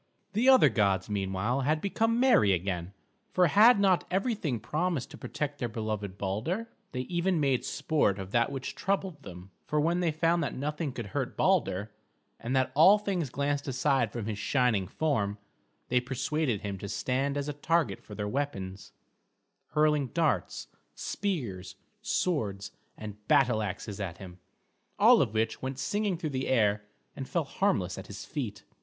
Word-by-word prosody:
The 235 +6 +3
other 260 -1 +7
gods 100 -2 +1
meanwhile 100 +6 -1
had 155 +4 +1
become 225 +5 0
merry 240 - +5
again; 90 0 -2 0.4
for 180 - +3
had 210 +7 +6
not 190 -3 +3
everything 190 - -1
promised 160 -2 -2
to - - -10
protect 145 -1 -4
their 120 - -2
beloved 110 -3 -4
Balder? 120 - -2 0.2
They 125 - -3
even 175 +4 0
made 135 -4 +1
sport 145 -11 +1
of 95 -1 -7
that 120 +3 +2
which 135 -1 -4
troubled 190 -5 -2
them, 90 -4 -11 0.2
for 150 - +1
when 170 +4 +2
they 175 -2 +1
found 165 +2 +1
that - - -3
nothing 150 +2 -3
could 120 -3 -6
hurt - - -2
Balder, 100 +4 +1 0.5
and 120 +3 -2
that 130 -1 +2
all 185 +8 +7
things 190 -8 -2
glanced 140 +2 -1
aside 130 -3 +1
from 115 -4 -4
his 105 -1 -4
shining 115 -6 +1
form, 105 - -1 0.5
they 125 - +3
persuaded 130 -1 -1
him 100 -2 -4
to 100 - -6
stand 135 +5 -1
as 140 0 -2
a 150 - -2
target 145 - 0
for 105 - -11
their 105 0 -3
weapons; 100 -7 -4 0.8
hurling 150 -2 +3
darts, 165 +4 -1 0.3
spears, 120 - -3 0.3
swords, 100 - -1 0.3
and 105 -1 -9
battle 125 -7 +4
axes 100 0 -5
at 90 -4 -4
him, 90 -2 -11 0.6
all - - +7
of 110 - -1
which 110 +1 0
went 130 0 -4
singing 200 +7 -1
through 160 -3 -3
the 130 0 -2
air 105 -4 +2 0.3
and 135 -2 -6
fell 170 - 0
harmless 120 - 0
at 95 - -9
his 100 +1 -8
feet. 130 -9 -5
130 Hz, 165 wpm, -29 LUFS, 105-160 Hz, 0.8 s, other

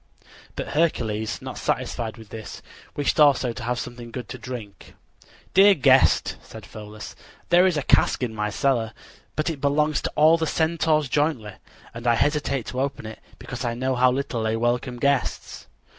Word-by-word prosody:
But - - -5
Hercules, 110 -9 -1
not - - -6
satisfied 115 0 -2
with 110 -2 -13
this, 110 -1 -9 0.3
wished 145 +3 0
also 135 -5 +4
to 120 - -8
have 120 +1 -2
something 120 -1 -7
good 125 +1 -7
to 125 - -7
drink. 115 -5 -9 0.6
"Dear 195 +1 +7
guest," 135 - +4
said 110 -2 -12
Pholus, 110 0 -10 0.3
"there 175 +2 +6
is 175 -4 0
a 145 - -1
cask - - +3
in 120 -3 -2
my 105 -1 -2
cellar; 115 -1 0 0.4
but 155 +2 0
it 145 -4 -8
belongs 150 +2 +1
to - - -3
all 160 +2 +5
the 160 - 0
Centaurs 160 -2 +1
jointly, 130 -7 -1 0.4
and 115 +1 -6
I 120 - +4
hesitate 140 -2 0
to 130 - -3
open 140 -4 -3
it 110 0 -8 0.2
because 125 -1 -7
I 120 -1 -2
know 130 +2 -1
how 125 0 +4
little 130 -3 -2
they 110 0 0
welcome 120 +2 -1
guests." 140 +1 -1
125 Hz, 175 wpm, -24 LUFS, 115-150 Hz, 0.6 s, Dear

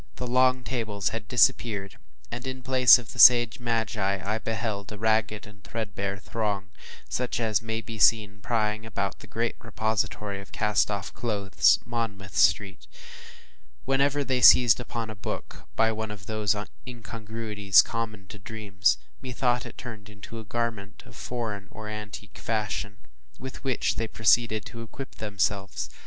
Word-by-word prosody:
The 125 - -5
long 130 +1 +3
tables 110 -6 -2
had 115 -1 -6
disappeared, 115 -5 +2 0.3
and, 120 +2 -5
in 130 -1 -6
place 130 -1 +7
of 120 -3 -10
the 120 - -10
sage 120 0 +8
magi, 110 -4 -1
I 105 +3 -1
beheld 110 -3 -3
a 105 - -7
ragged, 110 -1 -1
threadbare 100 -3 -4
throng, 100 -2 -3 0.4
such 125 -1 -2
as 110 -3 +1
may 110 0 -3
be 110 -1 -8
seen 105 -2 +3
plying 110 -1 -1
about 100 -3 -3
the - - -13
great 115 +1 -2
repository 105 -3 -2
of 100 - -15
cast 105 -1 +1
off 100 -2 -4
clothes, 105 -5 +2
Monmouth 110 -5 -4
Street. 95 - +2 1.0
Whenever 140 +2 +2
they 130 -2 0
seized 120 0 +8
upon 115 -2 -4
a - - -8
book, 100 - -7
by 115 0 +3
one 110 0 -4
of 100 -1 -9
those 105 -1 0 0.3
incongruities 110 -4 +1
common 110 -4 -5
to 105 - -10
dreams, 100 -2 0 0.2
methought 125 -1 -1
it - - -12
turned 110 -4 -9
into 105 +2 -10
a - - -8
garment 110 -3 -4
of - - -15
foreign 110 -5 -5
or 110 0 -9
antique 105 -1 -8
fashion, 105 -2 -3 0.4
with 130 +1 -9
which 130 -3 0
they 115 - -1
proceeded 110 -1 +2
to 115 - -8
equip 130 +4 -9
themselves. 100 -2 -2
110 Hz, 150 wpm, -27 LUFS, 105-120 Hz, 1.0 s, sage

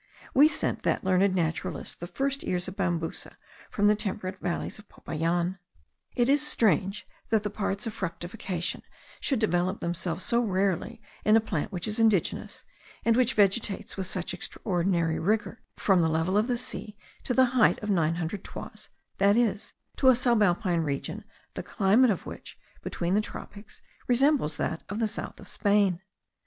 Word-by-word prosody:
We 285 +3 +7
sent - - -2
that - - 0
learned 190 0 +3
naturalist 165 -3 -2
the 175 - -6
first 275 +7 -2
ears 180 0 -1
of 185 - -6
Bambusa 175 -4 -3 0.3
from 205 - 0
the 210 - +6
temperate 195 -2 -4
valleys 175 +4 -3
of 210 - -16
Popayan. 170 +3 -2 0.6
It 240 -1 +2
is 285 +2 +4
strange 215 -7 +1 0.2
that 220 -2 +2
the 210 - -2
parts 200 0 -2
of 225 - -3
fructification 175 -1 -4 0.4
should 270 - +1
develop 185 -3 +1
themselves 170 +1 -2
so 235 0 +2
rarely 200 +2 -1 0.2
in 215 - +5
a - - +7
plant 205 -3 -3
which 180 -1 -3
is 215 +2 -1
indigenous, 220 -6 +1 0.4
and 230 - +4
which 255 +1 +2
vegetates 205 0 +1
with 190 -2 -3
such 180 0 -3
extraordinary 175 -3 -1
rigour, 215 +5 0 0.2
from 190 -3 +3
the 165 - +3
level 165 +4 0
of 215 +3 +3
the 245 -2 0
sea 215 -3 -5 0.3
to 250 - -1
the 260 - +6
height 245 -4 +4
of 210 - -1
nine 165 -3 +2
hundred 175 +3 -4
toises, - - -8 0.3
that 200 +2 +5
is, 215 -4 0 0.2
to 260 - +5
a - - +8
subalpine 205 -8 +2
region 140 -3 -3 0.3
the - - -4
climate 220 +5 +3
of 195 - -1
which, - - -9 0.2
between 175 +1 -2
the 210 - +4
tropics, 205 0 -10 0.2
resembles 265 - +2
that 160 - -2
of 200 - -4
the 225 -1 +1
south 215 - -6
of - - -12
Spain. 200 -4 +2
200 Hz, 170 wpm, -28 LUFS, 175-225 Hz, 0.6 s, a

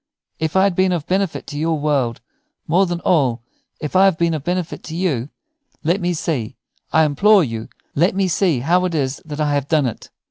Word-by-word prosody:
If 160 +1 -2
I 190 - +5
have 200 -2 +3
been 185 0 +2
of 165 -4 -2
benefit 190 -1 -1
to 145 - -6
your 160 0 0
world; 140 -6 0 0.5
more 185 +4 +3
than 175 0 -3
all, 130 -9 +1 0.4
if 150 +3 -5
I 190 +1 +6
have 190 -4 +3
been 170 0 +1
of 155 -3 -3
benefit 175 +1 -2
to 160 - -6
you, 150 -8 -1 0.5
let 175 +5 +1
me 175 0 0
see, 135 -7 -3 0.4
I 160 0 +4
implore 195 +7 +4
you 115 -5 -5 0.2
let 175 +6 +2
me 195 -1 +1
see 170 -6 +1
how 180 +7 +2
it 175 -2 -2
is 135 -2 -1
that 150 -1 -7
I 150 -1 +1
have 140 -1 -1
done 155 -3 +2
it." 120 - -5
160 Hz, 215 wpm, -20 LUFS, 145-180 Hz, 0.5 s, I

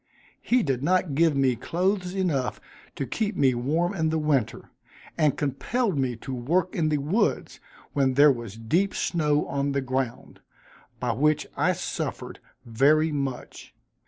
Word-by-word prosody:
He 245 -1 +2
did 135 -4 -1
not 180 0 +1
give 160 +1 +3
me 130 -2 +2
clothes 180 - -1
enough 160 -10 -1 0.4
to 140 - -3
keep 215 - -2
me 135 -5 +3
warm 155 +10 0
in 160 -4 0
winter, 140 -7 -1 0.4
and 155 -4 +2
compelled 200 - -1
me 130 -3 -1
to 130 +4 -7
work 165 +9 0
in 155 -2 +1
the 150 - +1
woods, 155 +11 -1 0.3
when 135 -2 +1
there 145 +1 +7
was 115 -5 -6
deep 170 - 0
snow 150 -3 +1
on 140 0 -2
the 140 - 0
ground, 130 -2 -4 0.6
by 125 -1 -1
which 150 +3 +1
I - - +2
suffered - - -5 0.3
very 145 +7 +3
much. 140 -3 -5
145 Hz, 150 wpm, -26 LUFS, 130-170 Hz, 0.6 s, there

